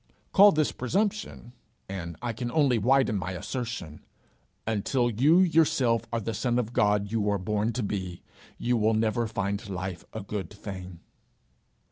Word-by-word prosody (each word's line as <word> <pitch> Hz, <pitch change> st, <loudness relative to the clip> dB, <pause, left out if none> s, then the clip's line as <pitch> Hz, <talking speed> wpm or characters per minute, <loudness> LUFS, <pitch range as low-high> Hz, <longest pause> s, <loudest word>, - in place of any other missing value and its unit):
Call 205 Hz, +1 st, +8 dB
this 155 Hz, -2 st, +1 dB
presumption, 195 Hz, -, -2 dB, 0.3 s
and 85 Hz, -4 st, -6 dB
I 120 Hz, -1 st, -1 dB
can 120 Hz, +2 st, -4 dB
only 135 Hz, -6 st, +3 dB
widen 125 Hz, -2 st, +3 dB
my 95 Hz, +1 st, -4 dB
assertion: 115 Hz, -, -5 dB, 0.6 s
until 120 Hz, +3 st, 0 dB
you 145 Hz, -, +5 dB
yourself 150 Hz, -9 st, +3 dB
are 115 Hz, -, 0 dB
the 115 Hz, +1 st, -3 dB
son 120 Hz, +3 st, 0 dB
of 120 Hz, -1 st, -1 dB
God 105 Hz, -3 st, +2 dB
you 115 Hz, -1 st, 0 dB
were 100 Hz, 0 st, +1 dB
born 105 Hz, +4 st, -1 dB
to 125 Hz, -, -2 dB
be, 95 Hz, -4 st, -4 dB, 0.3 s
you 120 Hz, 0 st, +1 dB
will 110 Hz, 0 st, +2 dB
never 110 Hz, +1 st, +1 dB
find 100 Hz, -2 st, -3 dB
life 95 Hz, -2 st, -4 dB
a 110 Hz, -, -5 dB
good 100 Hz, -3 st, -5 dB
thing. 95 Hz, -4 st, -8 dB
110 Hz, 155 wpm, -27 LUFS, 100-125 Hz, 0.6 s, Call